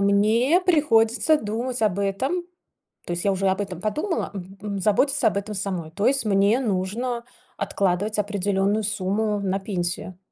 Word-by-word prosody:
мне 215 - +3
приходится 295 -4 +3
думать 230 +3 -3
об 200 -3 +2
этом, 260 - -1 0.6
то 175 - -3
есть 175 - -3
я 200 - +3
уже 195 0 +1
об 190 +1 +1
этом 190 -4 -4
подумала, 300 - -2
мгм, 195 +2 -6
заботиться 215 +8 +2
об 200 - -4
этом 210 +1 -5
самой. 185 -5 -3
То 200 +4 -1
есть 270 -1 +2
мне 200 +4 +3
нужно 235 +3 -2 0.3
откладывать 200 +3 -1
определенную 205 +1 0
сумму 210 +1 -1
на 195 -1 0
пенсию. 180 -2 -3
205 Hz, 150 wpm, -24 LUFS, 195-225 Hz, 0.6 s, мне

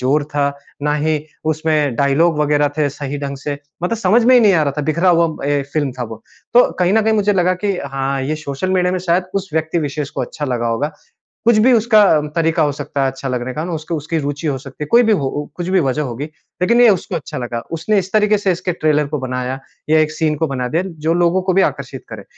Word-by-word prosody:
जोर 140 +3 +1
था, 140 -1 +2 0.3
ना 150 0 +1
ही 155 +1 +1 0.3
उसमें 155 -4 0
डायलॉग 150 +4 +2
वग़ैरह 150 -1 +2
थे 150 -2 +2
सही 145 +1 -5
ढंग 140 -1 -4
से 145 +1 -5 0.2
मतलब 205 +6 0
समझ 225 +3 +3
में 255 +1 +6
ही 245 - +7
नहीं 210 -3 +5
आ 160 - +3
रहा 140 -2 0
था 150 - 0
बिखरा 170 +4 +1
हुआ 165 -4 +2
ए 145 -1 +1
फ़िल्म 145 -4 0
था 125 0 -6
वह। 110 -1 -8 0.4
तो 245 - +6
कहीं 180 0 +2
न 220 +1 +4
कहीं 220 +1 +2
मुझे 205 -1 +2
लगा 185 -1 +2
कि 200 -2 +1 0.2
हाँ 135 0 -1
ये 155 +3 -2
सोशल 150 +5 -4
मीडिया 180 -1 +2
में 185 - 0
शायद 180 +1 +1
उस 195 -1 -2
व्यक्ति 160 +2 0
विशेष 145 -1 -3
को - - -4
अच्छा 150 - -5
लगा 120 -3 -1
होगा। 125 +7 -1 0.5
कुछ 235 -2 +5
भी 255 - +6
उसका 220 -2 +5 0.3
तरीका 165 0 +2
हो 145 - +2
सकता 140 0 -4
है 135 - +1
अच्छा 135 +1 -6
लगने 125 0 -3
का 155 - -3
मैं 175 -1 -3
उसको 155 +2 -4
उसकी 155 +2 -2
रूचि 145 +2 -3
हो 140 - 0
सकती 150 +3 -8
है, - - -9
कोई 240 +1 +6
भी 225 -2 +3
हो 145 -9 +1
ओ 145 +2 -3
कुछ 175 0 -4
भी 190 0 +3
वजह 140 0 0
होगी। 130 0 -4 0.4
लेकिन 235 +6 +4
ये 245 - +7
उसको 190 -1 -1
अच्छा 155 -1 -5
लगा। 120 -1 -4
उसने 200 +6 +1
इस 190 0 -2
तरीके 210 -1 +3
से 195 -2 +1
इसके 180 +1 -2
ट्रेलर 150 -3 +1
को 150 - -2
बनाया 130 0 -3 0.3
या 155 - +5
एक 155 0 +1
सीन 155 -1 0
को 160 - 0
बना 125 -3 -3
दिया 165 +7 0 0.2
जो 165 - +3
लोगों 175 +2 +2
को 185 0 0
भी 190 +1 +4
आकर्षित - - -3
करे। - - -9
155 Hz, 255 wpm, -18 LUFS, 140-185 Hz, 0.5 s, ही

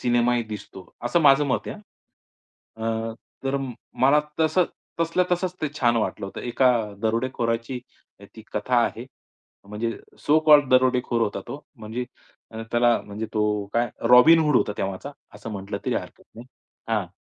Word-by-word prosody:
सिनेमाही 120 0 +2
दिसतो. 105 -3 -9 0.2
असं 120 +8 +2
माझं 145 -1 +6
मत 130 - -1
आहे. - - -5 1.0
हं, 115 0 -2 0.3
तर 135 +1 0 0.5
मला 140 +3 +6 0.2
तसं 160 +3 +3 0.4
तसल्या 165 +2 +2
तसंच 180 +1 -1
ते 155 - +1
छान 120 -1 +3
वाटलं 110 -3 -2
होतं. 95 - -8
एका 125 +1 +2 0.3
दरोडेखोराची 115 +1 -1 0.6
ती 110 - -10
कथा 115 +4 0
आहे. 120 +3 -5 0.6
म्हणजे 115 +2 -2 0.3
सो 150 +2 +3
कॉल्ड 145 -3 +7
दरोडेखोर 125 -2 +3
होता 105 - -1
तो. 145 +1 -7
म्हणजे 115 +2 -5 0.5
अ, 110 0 -6
त्याला 120 0 +3
म्हणजे 105 +2 -5
तो 105 -1 +1
काय, 120 +1 +2 0.2
रॉबिनहुड 150 +3 +7
होता 105 - +1
तेव्हाचा, 95 +8 -4 0.2
असं 105 +2 -8
म्हटलं 100 0 -5
तरी - - +1
हरकत - - -5
नाही. 120 +3 -11 0.4
हां, 105 -5 0
120 Hz, 145 wpm, -24 LUFS, 110-135 Hz, 1.0 s, कॉल्ड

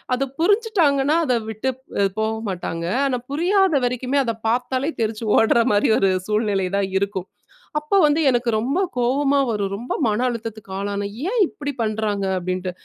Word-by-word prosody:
அது 275 - -1
புரிஞ்சுட்டாங்கன்னா 335 - +2
அத 250 -4 +2
விட்டுப்போக 220 -3 -2 0.2
மாட்டாங்க. 170 -2 -4 0.2
ஆனா 255 -2 0
புரியாத 370 +3 +2
வரைக்குமே 250 +3 0
அத 230 -2 -1 0.2
பாத்தாலே 255 +4 0
தெறிச்சு 220 +1 -2
ஓடுற 230 +1 +4
மாதிரி 205 - +3
ஒரு 195 - +3 0.2
சூழ்நிலை 210 -3 0
தான் 195 -1 0
இருக்கும். 195 -2 -3 0.5
அப்ப 300 +6 -7
வந்து 300 +2 +2
எனக்கு 240 -1 +1
ரொம்ப 270 +10 -1 0.2
கோவமா 275 +3 +2
வரும். 200 -2 -2
ரொம்ப 240 +3 -4
மன 215 +2 0
அழுத்தத்துக்கு 225 -4 -6
ஆளானேன். 200 0 -3 0.2
ஏன் 475 0 0
இப்டிப் 285 -5 -6
பண்றாங்க? 215 -2 -1
அப்டின்ட்டு. 185 +1 -3
235 Hz, 145 wpm, -22 LUFS, 205-280 Hz, 0.5 s, ஓடுற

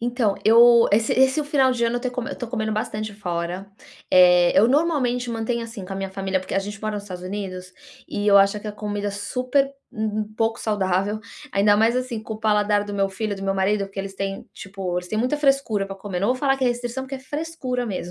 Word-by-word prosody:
Então, 235 -4 0
eu, 235 +1 +7
esse 220 +1 +3
esse 265 +4 +3
final 275 -3 +3
de 235 -1 0
ano 235 +1 0
eu - - -2
tô 250 0 -3
eu - - -7
tô 245 - -4
comendo 220 -2 -2
bastante 215 0 -3
fora, 180 -1 -4 0.4
eh, 180 -1 +6
eu 220 +4 +6
normalmente 260 -5 +1
mantenho 230 +1 -2
assim 225 -4 -8
com 195 - -8
a - - -4
minha 195 0 -4
família 190 0 -1
porque 185 +1 -6
a - - +3
gente 205 +1 -7
mora 215 0 -3
nos 205 - -4
Estados 180 -3 -8
Unidos 185 -1 -6 0.4
e 205 - -3
eu 200 -1 +7
acho 200 +1 +3
que 215 - -6
a - - -5
comida 205 -1 -3
é - - -3
super 255 +7 0 0.2
um 215 -1 -3
um - - +1
pouco 225 +1 0
saudável, 200 0 0 0.3
ainda 205 -2 +4
mais 225 +3 +3
assim 250 -3 -3
com 220 0 -6
o - - -9
paladar 210 -1 +2
do 205 - -7
meu 195 -1 +1
filho, 205 +2 -3
do 195 - -9
meu 195 0 0
marido 200 +1 +1
porque 195 0 -11
eles 195 0 -4
têm, 195 0 -4
tipo, 190 -2 -5
eles 180 - -8
têm 215 - -2
muita 250 +5 +1
frescura 275 -8 +1
pra 195 0 -8
comer, 190 -3 -5
não 200 - +1
vou 255 - +2
falar 270 0 +1
que 265 - 0
é 250 - +4
restrição 245 +2 -3
porque 270 - -7
é - - -10
frescura 265 -3 -4
mesmo. 185 -4 -4
215 Hz, 245 wpm, -23 LUFS, 195-245 Hz, 0.4 s, eu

